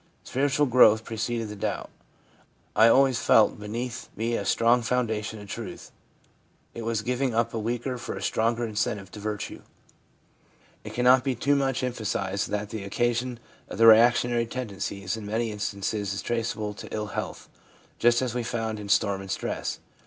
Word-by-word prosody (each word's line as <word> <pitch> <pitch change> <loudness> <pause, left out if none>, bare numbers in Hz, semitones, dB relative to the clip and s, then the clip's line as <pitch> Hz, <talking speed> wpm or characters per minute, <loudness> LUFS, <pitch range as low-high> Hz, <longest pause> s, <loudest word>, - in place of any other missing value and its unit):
Spiritual 140 +2 +1
growth 115 -4 +6
preceded 115 0 -2
the 105 - -6
doubt; 100 - -3 0.8
I 110 - +7
always 130 +1 +4
felt 110 -1 +4
beneath 115 +3 -5
me 115 +2 -1
a - - -2
strong 120 +1 +3
foundation 115 -3 -1
of 105 - -10
truth; - - -7 0.8
it 115 - -6
was 115 -1 -1
giving 125 0 -1
up 115 0 +1
a 115 - -2
weaker 120 +3 -2
for - - -5
a - - -6
stronger 115 +1 +1
incentive 105 -3 -2
to 105 - -9
virtue/ 105 0 -5 1.2
It - - -8
cannot 125 +1 +5
be 135 -2 0
too 140 +5 +2
much 135 -2 0
emphasised 105 -5 -2
that 105 0 -3
the 110 -3 -5
occasion 120 +4 -1 0.3
of - - -6
the 115 - +5
reactionary 120 +1 +6
tendencies 100 -5 -4
in 110 - -7
many 110 +1 -1
instances 100 -1 -3
is - - -4
traceable 115 -3 -2
to - - -10
ill 105 -1 -2
health, - - -5 0.5
just; 120 +1 +4
as 125 -3 -2
we 125 - -1
found 115 -2 -3
in 105 -1 -8
storm 100 -2 +2
and 95 - -9
stress. - - -3
115 Hz, 165 wpm, -26 LUFS, 105-120 Hz, 1.2 s, I